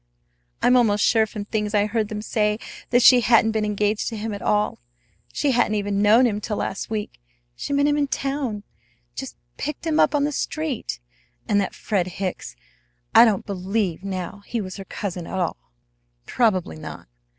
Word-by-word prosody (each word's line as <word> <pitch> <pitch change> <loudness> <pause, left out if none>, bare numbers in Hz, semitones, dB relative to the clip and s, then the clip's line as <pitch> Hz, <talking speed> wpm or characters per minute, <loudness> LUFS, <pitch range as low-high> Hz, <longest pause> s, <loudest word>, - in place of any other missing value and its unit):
I'm 250 - +5
almost 210 -4 +3
sure 220 -1 +3
from 210 -2 -6
things 210 0 -2
I 205 0 +4
heard 215 0 -1
them 210 0 -5
say 210 -1 +1 0.3
that 245 0 +4
she 250 -1 +8
hadn't 225 -1 +4
been 220 -1 0
engaged 210 0 0
to 225 - -4
him 215 +1 -4
at 200 - -6
all, 210 0 +1 0.5
she 290 - +1
hadn't 240 -3 +2
even 205 -1 0
known 220 +5 +6
him 210 -3 0
till 210 -1 -3
last 195 - -3
week. 210 - -4 0.3
She - - -6
met 285 0 +3
him 295 0 +2
in 285 - +1
town 270 -7 -2 0.5
just 265 - -6 0.2
picked 300 +2 -5
him 320 -1 +1
up - - +4
on 285 - +2
the 295 - 0
street! 295 - -3 0.5
And 205 -1 +3
that 195 - -3
Fred 190 -4 -1
Hicks! 185 - -4 0.6
I - - +9
don't 210 -5 +1
believe 195 -2 -2
now 190 +1 -5
he 235 - -2
was 185 -2 -6
her 195 - -8
cousin 180 -4 -5
at - - -4
all." 175 - -3 0.5
"Probably 190 - +1
not. - - -9
210 Hz, 185 wpm, -23 LUFS, 200-240 Hz, 0.6 s, I